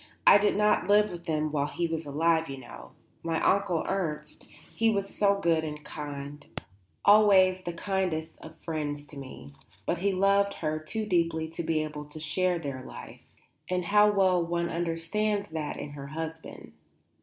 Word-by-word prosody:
I -, -, +9 dB
did 205 Hz, -, +2 dB
not 210 Hz, -3 st, +2 dB
live 210 Hz, 0 st, +4 dB
with 170 Hz, -1 st, -8 dB
them 155 Hz, -1 st, -1 dB
while 145 Hz, -1 st, 0 dB
he 170 Hz, +3 st, -2 dB
was 165 Hz, -2 st, -3 dB
alive, 160 Hz, +2 st, +1 dB
you 135 Hz, -, -5 dB
know, 65 Hz, -, -12 dB, 0.3 s
my 165 Hz, -1 st, -1 dB
Onkel 190 Hz, -4 st, +1 dB
Ernst; 155 Hz, -6 st, -3 dB, 0.3 s
he 225 Hz, 0 st, +3 dB
was 200 Hz, -2 st, -1 dB
so 200 Hz, -1 st, +3 dB
good 165 Hz, -3 st, +2 dB
and 150 Hz, -1 st, -6 dB
kind 145 Hz, -1 st, -7 dB, 0.6 s
always 195 Hz, -3 st, +6 dB
the 175 Hz, -1 st, -5 dB
kindest 170 Hz, -3 st, -2 dB
of 160 Hz, 0 st, -12 dB
friends 145 Hz, -3 st, -3 dB
to 150 Hz, -, -12 dB
me; 70 Hz, -, -10 dB, 0.3 s
but 170 Hz, -, -1 dB
he 200 Hz, +2 st, +1 dB
loved 200 Hz, +1 st, +2 dB
her 155 Hz, 0 st, -2 dB
too 215 Hz, +8 st, -4 dB
deeply 165 Hz, -4 st, +1 dB
to 165 Hz, +1 st, -5 dB
be 160 Hz, -1 st, 0 dB
able 150 Hz, -1 st, -6 dB
to 150 Hz, +1 st, -10 dB
share 175 Hz, +4 st, 0 dB
their 140 Hz, -5 st, -5 dB
life, -, -, -10 dB, 0.5 s
and 180 Hz, -1 st, -1 dB
how 210 Hz, +2 st, +5 dB
well 190 Hz, -3 st, +3 dB
one 170 Hz, 0 st, -1 dB
understands 175 Hz, +5 st, -1 dB
that 155 Hz, -2 st, -4 dB
in 145 Hz, -, -6 dB
her 140 Hz, -1 st, -8 dB
husband. 160 Hz, +2 st, -7 dB
165 Hz, 175 wpm, -28 LUFS, 150-190 Hz, 0.6 s, I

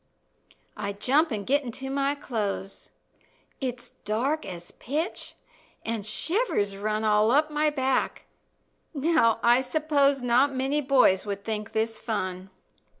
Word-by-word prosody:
I 200 Hz, -2 st, -3 dB
jump 275 Hz, +10 st, +2 dB
an' 210 Hz, -3 st, -2 dB
get 280 Hz, +6 st, +2 dB
into 265 Hz, +2 st, -5 dB
my 275 Hz, +1 st, 0 dB
clothes; 205 Hz, -7 st, -4 dB, 0.7 s
It's 250 Hz, -2 st, -4 dB
dark 265 Hz, +9 st, -1 dB
as 175 Hz, -2 st, -8 dB
pitch, 305 Hz, +8 st, -4 dB, 0.5 s
an' 225 Hz, -1 st, -2 dB
shivers 215 Hz, -, -1 dB
run 215 Hz, +2 st, -2 dB
All 215 Hz, 0 st, +4 dB
up 300 Hz, +5 st, +3 dB
my 300 Hz, +1 st, +2 dB
back. 265 Hz, -3 st, 0 dB, 0.7 s
Now, 285 Hz, -6 st, +3 dB
I 240 Hz, +2 st, +5 dB
suppose 280 Hz, 0 st, +1 dB
Not 255 Hz, +3 st, +3 dB
many 270 Hz, +3 st, 0 dB
boys 255 Hz, -8 st, +3 dB
would 200 Hz, 0 st, -4 dB
think 215 Hz, -1 st, -4 dB
this 220 Hz, 0 st, -1 dB
fun. 185 Hz, -4 st, -3 dB
245 Hz, 130 wpm, -26 LUFS, 215-280 Hz, 0.7 s, I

